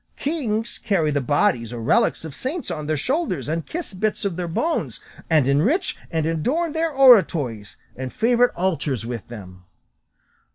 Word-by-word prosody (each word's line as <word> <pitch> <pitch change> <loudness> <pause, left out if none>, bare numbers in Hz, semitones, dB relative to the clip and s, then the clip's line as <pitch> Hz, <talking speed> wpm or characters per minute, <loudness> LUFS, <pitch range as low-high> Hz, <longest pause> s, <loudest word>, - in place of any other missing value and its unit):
Kings 235 -7 -2
carry 170 -8 +1
the 145 -1 0
bodies 135 - +1
or 120 - -6
relics 115 +7 +1
of 155 - -7
saints 285 - -4
on 150 -1 -5
their 155 0 0
shoulders, 250 - -1
and 160 +1 -3
kiss 340 - -5
bits 210 +2 -1
of 195 -4 -1
their 180 0 -3
bones, 320 - -2 0.3
and 155 -5 +3
enrich 195 - +2
and 160 -2 -1
adorn 265 - 0
their 325 +1 0
oratories 160 - +4 0.2
and 130 0 -5
favourite 240 +2 +2
altars 160 - -1
with 120 -2 -6
them." 95 -6 -11
165 Hz, 160 wpm, -22 LUFS, -, 0.3 s, oratories